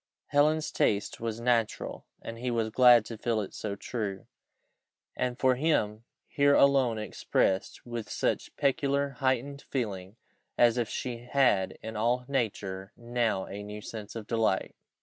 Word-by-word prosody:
Helen's 150 +2 +2
taste 100 -1 0
was 115 -1 -3
natural, 115 -2 -1 0.2
and 115 0 -7
he 125 +1 -2
was 115 -2 0
glad 120 -2 +7
to 115 -2 -8
feel 115 -1 0
it 100 - -5
so 105 -2 -4
true, 100 -3 -4 0.9
and 125 -1 -1
for 130 -1 +4
him 115 -6 0 0.2
here 140 0 +3
alone 135 -5 +4
expressed 95 -2 -1
with 120 -2 -5
such - - -1
peculiar 140 0 +1
heightened 135 +1 0
feeling, 100 -6 -3 0.4
as 120 0 +4
if 115 - -1
she 120 -2 -4
had 125 -9 +3
in 110 0 -6
all 120 +3 +1
nature 100 -7 -2
now 120 -5 -1
a 100 +1 -7
new 105 +1 -7
sense 105 0 -8
of 110 -2 -6
delight. 110 -4 0
115 Hz, 150 wpm, -29 LUFS, 105-130 Hz, 0.9 s, glad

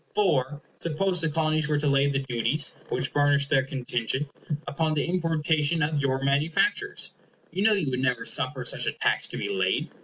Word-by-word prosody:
For, 150 -7 +1 0.2
suppose 180 +2 +1
the 165 - +1
Colonies 155 0 0
were 150 - +2
to 145 - -2
lay 140 0 +3
the 140 -1 0
duties, 135 +3 -1 0.2
which 135 - -1
furnished 145 -1 +2
their 135 - +4
contingent, 130 +1 -3 0.4
upon 155 +2 -1
the 145 - 0
importation 160 -2 0
of 150 0 0
your 135 -1 -1
manufactures, 165 - +1 0.4
you 185 - -3
know 220 0 +5
you 170 -10 0
would 125 - -2
never 125 -2 0
suffer - - +2
such - - +2
a - - 0
tax - - +1
to - - -6
be - - -3
laid. 95 -1 -1
145 Hz, 185 wpm, -26 LUFS, 135-160 Hz, 0.4 s, know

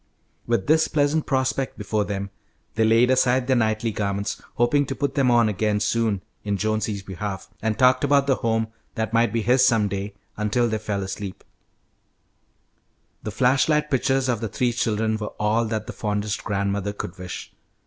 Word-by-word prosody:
With 115 -5 +1
this 160 +1 +4
pleasant 150 +1 +1
prospect 130 0 0
before 105 0 -1
them, 100 -1 -4 0.4
they 110 - +1
laid 115 +3 +4
aside 130 0 +3
their 130 0 +2
knightly 110 -1 +1
garments, 100 0 -2
hoping 130 +4 +2
to 135 - -3
put 140 -1 -1
them 135 -3 +2
on 120 -2 +4
again 105 0 0
soon 105 -2 0 0.2
in 100 -1 -1
Jonesy's 110 -1 -1
behalf, 95 0 -5
and 110 -1 -1
talked 130 +1 +4
about 140 -1 +4
the 135 -2 +2
home 115 -1 0 0.3
that 110 -1 -2
might 115 +1 +3
be 115 -1 -1
his 125 +3 +4
some 115 -5 +4
day, 100 +1 -4 0.2
until 105 +3 +1
they 110 -1 -1
fell 105 -2 -2
asleep. 95 0 -6 1.8
The - - -5
flash 130 +6 +2
light 150 0 +1
pictures 135 0 +1
of 120 -4 0
the 115 - -2
three 120 +4 0
children 110 -1 0
were 105 -1 -6
all 110 +2 +2
that 110 -1 -3
the 120 - -7
fondest 105 -1 -2
grandmother 100 0 -1
could 95 -2 -7
wish. 90 -1 -7
110 Hz, 180 wpm, -24 LUFS, 105-125 Hz, 1.8 s, this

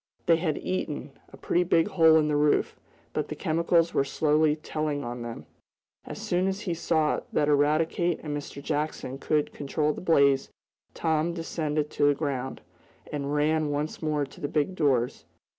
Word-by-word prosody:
They 165 - +5
had 160 -3 -1
eaten, 150 -6 -3 0.2
a - - -12
pretty 175 - +1
big 170 +1 +2
hole 160 -4 +5
in 155 -1 +3
the 150 - +1
roof, 145 0 +2 0.4
but - - -1
the - - -5
chemicals 165 +1 +1
were - - +3
slowly 150 +2 +2
telling 155 -2 -3
on 120 -1 -5
them. 120 -1 -7 0.6
As - - -7
soon 180 +2 0
as 195 +1 -2
he 180 -6 -2
saw 160 -2 +1
that 145 - +1
Eradicate 155 +4 +2
and 150 -2 -3
Mr. 140 -1 -7
Jackson 145 -3 -3
could 150 0 0
control 150 +1 -1
the - - -8
blaze, 140 -6 +3 0.5
Tom 160 +1 0
descended 155 -3 -2
to 145 - +2
the 145 - +4
ground, 135 -3 -3 0.5
and 145 0 -2
ran 155 +1 +2
once 145 +1 -3
more 150 -2 0
to 135 - -15
the 145 - -1
big 150 +5 0
doors. 130 -7 +1
150 Hz, 175 wpm, -27 LUFS, 145-165 Hz, 0.6 s, They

